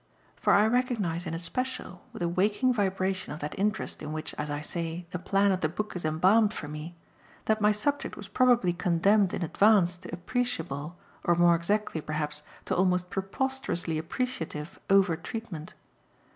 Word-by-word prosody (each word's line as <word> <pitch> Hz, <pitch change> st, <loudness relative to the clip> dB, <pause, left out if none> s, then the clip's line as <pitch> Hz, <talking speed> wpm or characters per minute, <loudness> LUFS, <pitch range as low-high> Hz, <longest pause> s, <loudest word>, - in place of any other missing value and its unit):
For -, -, +1 dB
I 205 Hz, +1 st, +6 dB
recognise 220 Hz, -8 st, 0 dB
in 165 Hz, -, -3 dB
especial, 185 Hz, +2 st, -3 dB
with -, -, -5 dB
a -, -, +2 dB
waking 205 Hz, +8 st, +2 dB
vibration 190 Hz, -4 st, -1 dB
of 150 Hz, -, -7 dB
that 150 Hz, -, -4 dB
interest 210 Hz, +2 st, -1 dB
in 150 Hz, -, -5 dB
which, 155 Hz, 0 st, -4 dB
as 150 Hz, -, -4 dB
I 145 Hz, 0 st, -2 dB
say, 165 Hz, +3 st, -3 dB
the 180 Hz, -, -3 dB
plan 195 Hz, +2 st, +2 dB
of 185 Hz, -1 st, 0 dB
the 155 Hz, -, +1 dB
book 210 Hz, +6 st, -4 dB
is 180 Hz, -, -4 dB
embalmed 190 Hz, +8 st, +3 dB
for 145 Hz, -, -5 dB
me, 150 Hz, +3 st, -7 dB, 0.5 s
that 220 Hz, 0 st, +1 dB
my 210 Hz, 0 st, +5 dB
subject 285 Hz, +8 st, -1 dB
was 205 Hz, -, -8 dB
probably 240 Hz, -7 st, +3 dB
condemned 180 Hz, +3 st, +3 dB
in -, -, -2 dB
advance 180 Hz, 0 st, +4 dB
to 180 Hz, +1 st, -10 dB
appreciable, 175 Hz, -, -3 dB, 0.3 s
or 175 Hz, -, +3 dB
more 175 Hz, 0 st, +5 dB
exactly 170 Hz, 0 st, 0 dB
perhaps 150 Hz, -1 st, -3 dB, 0.2 s
to -, -, -1 dB
almost 180 Hz, -1 st, +1 dB
preposterously 195 Hz, -, -1 dB
appreciative, 165 Hz, -, -4 dB
over 195 Hz, -3 st, +5 dB
treatment. 175 Hz, -2 st, -7 dB
180 Hz, 170 wpm, -28 LUFS, 165-210 Hz, 0.5 s, I